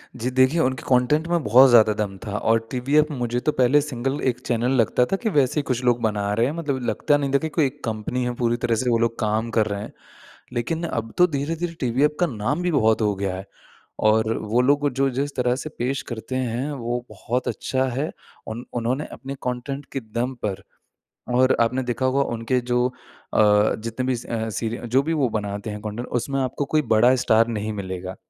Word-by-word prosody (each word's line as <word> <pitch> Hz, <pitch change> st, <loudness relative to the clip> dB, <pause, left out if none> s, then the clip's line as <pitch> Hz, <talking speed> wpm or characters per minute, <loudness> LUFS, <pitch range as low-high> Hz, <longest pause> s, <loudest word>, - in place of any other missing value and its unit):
जी 125 Hz, +1 st, -2 dB
देखिए 130 Hz, +5 st, +3 dB
उनके 130 Hz, -2 st, 0 dB
कंटेंट 135 Hz, +5 st, +3 dB
में 170 Hz, -2 st, 0 dB
बहुत 130 Hz, +5 st, +7 dB
ज़्यादा 110 Hz, -3 st, +6 dB
दम 105 Hz, -2 st, -3 dB
था 105 Hz, -1 st, -3 dB
और 115 Hz, +1 st, +2 dB
टीवीएफ 140 Hz, +4 st, +2 dB
मुझे 120 Hz, -3 st, -1 dB
तो -, -, +5 dB
पहले 130 Hz, +2 st, +4 dB
सिंगल 135 Hz, -1 st, -3 dB
एक 125 Hz, -1 st, -3 dB
चैनल 120 Hz, +1 st, +1 dB
लगता 115 Hz, +4 st, +2 dB
था -, -, +3 dB
कि 225 Hz, -, +2 dB
वैसे 145 Hz, -4 st, +2 dB
कुछ 125 Hz, -3 st, -2 dB
लोग 120 Hz, -1 st, +2 dB
बना 105 Hz, -2 st, 0 dB
रहे 115 Hz, +3 st, +2 dB
हैं 140 Hz, -, -1 dB
मतलब 150 Hz, -5 st, -2 dB
लगता 145 Hz, +6 st, +2 dB
नहीं 140 Hz, -2 st, -2 dB
था 140 Hz, -, +6 dB
कि 160 Hz, +2 st, -3 dB
कोई 155 Hz, -, +5 dB
एक 140 Hz, +2 st, -5 dB
कंपनी 115 Hz, +3 st, -2 dB
है 125 Hz, 0 st, -1 dB
पूरी 120 Hz, -1 st, 0 dB
तरह 115 Hz, -1 st, 0 dB
से 125 Hz, -, +1 dB
वो 115 Hz, -, +3 dB
लोग 115 Hz, 0 st, 0 dB
काम 110 Hz, +2 st, 0 dB
कर 110 Hz, -, +4 dB
रहे 100 Hz, -1 st, -3 dB
हैं। -, -, -7 dB, 0.6 s
लेकिन 145 Hz, +8 st, -2 dB
अब 115 Hz, -9 st, -3 dB
तो 180 Hz, -, +6 dB
धीरे-धीरे 165 Hz, +3 st, -3 dB
टीवीएफ 135 Hz, +4 st, +1 dB
का 180 Hz, -, +4 dB
नाम 130 Hz, +6 st, -2 dB
भी 180 Hz, -, 0 dB
बहुत 110 Hz, -7 st, +3 dB
हो 105 Hz, -1 st, +2 dB
गया 95 Hz, -1 st, -2 dB
है। 95 Hz, +1 st, -7 dB, 0.6 s
और 110 Hz, +1 st, +3 dB
वो 110 Hz, +3 st, +1 dB
लोग 145 Hz, +2 st, +3 dB
जो 135 Hz, +1 st, +2 dB
जिस 140 Hz, +2 st, -3 dB
तरह 125 Hz, -1 st, +1 dB
से 150 Hz, +4 st, -5 dB
पेश 130 Hz, +3 st, -1 dB
करते 115 Hz, +3 st, -5 dB
हैं 130 Hz, +2 st, -2 dB
वो 120 Hz, -2 st, -3 dB
बहुत 115 Hz, +5 st, -3 dB
अच्छा 130 Hz, -1 st, -1 dB
है। 135 Hz, +6 st, -2 dB, 0.4 s
उन 110 Hz, +2 st, -5 dB
उन्होंने 125 Hz, +5 st, -1 dB
अपने 135 Hz, +1 st, -7 dB
कंटेंट 125 Hz, +3 st, -3 dB
के 135 Hz, -, -2 dB
दम 120 Hz, +3 st, -3 dB
पर 100 Hz, -3 st, -3 dB, 0.7 s
और 130 Hz, +1 st, +4 dB
आपने 125 Hz, +3 st, +2 dB
देखा 125 Hz, +1 st, -1 dB
होगा 135 Hz, +2 st, +2 dB
उनके 115 Hz, +3 st, 0 dB
जो 125 Hz, 0 st, +1 dB
अ, 125 Hz, -, -14 dB, 0.8 s
जितने 115 Hz, +3 st, -4 dB
भी 130 Hz, -1 st, +1 dB
स 115 Hz, -, -9 dB
अ, 110 Hz, -1 st, -2 dB
सीरि 115 Hz, +3 st, -3 dB
जो 130 Hz, +4 st, +3 dB
भी 160 Hz, +3 st, -2 dB
वो 145 Hz, -5 st, +2 dB
बनाते 105 Hz, -1 st, -3 dB
हैं 105 Hz, 0 st, -6 dB
कंटेंट 110 Hz, +3 st, -5 dB
उसमें 135 Hz, +3 st, -1 dB
आपको 130 Hz, +2 st, -1 dB
कोई 155 Hz, +2 st, +1 dB
बड़ा 120 Hz, +4 st, +5 dB
स्टार 115 Hz, +1 st, +5 dB
नहीं 110 Hz, -1 st, -3 dB
मिलेगा। 95 Hz, -2 st, -5 dB
125 Hz, 215 wpm, -23 LUFS, 110-135 Hz, 0.8 s, बहुत